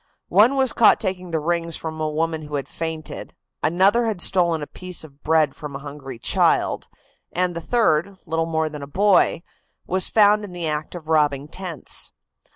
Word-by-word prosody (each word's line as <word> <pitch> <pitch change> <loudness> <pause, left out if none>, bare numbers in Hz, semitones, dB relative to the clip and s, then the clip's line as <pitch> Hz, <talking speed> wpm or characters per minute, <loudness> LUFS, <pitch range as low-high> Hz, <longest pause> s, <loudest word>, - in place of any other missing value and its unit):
One 215 +9 +5
was 265 -2 +2
caught 225 - +5
taking 185 -3 -3
the 165 -1 -1
rings 170 +1 -1
from 160 -1 -5
a 155 - 0
woman 160 +1 -1
who 150 - -5
had 140 - -3
fainted, 160 -1 -6 0.3
another 195 +8 +3
had 215 -5 -2
stolen 170 -4 +2
a - - -3
piece 180 +3 -5
of 145 -2 -15
bread 155 -3 +2
from 150 -2 -8
a 140 +1 -8
hungry 140 -3 -8
child, - - +2 0.4
and 180 0 0
the 170 - -4
third, 195 -3 +1
little 165 -1 -1
more 160 -1 0
than 150 -1 -7
a 140 - -7
boy, 190 +1 +3 0.4
was 185 +1 0
found 210 -1 +4
in 195 -3 -8
the 175 -2 -3
act 150 +2 -3
of 160 -3 -9
robbing 145 -3 +2
tents. 175 -2 -4
165 Hz, 185 wpm, -22 LUFS, 150-185 Hz, 0.4 s, One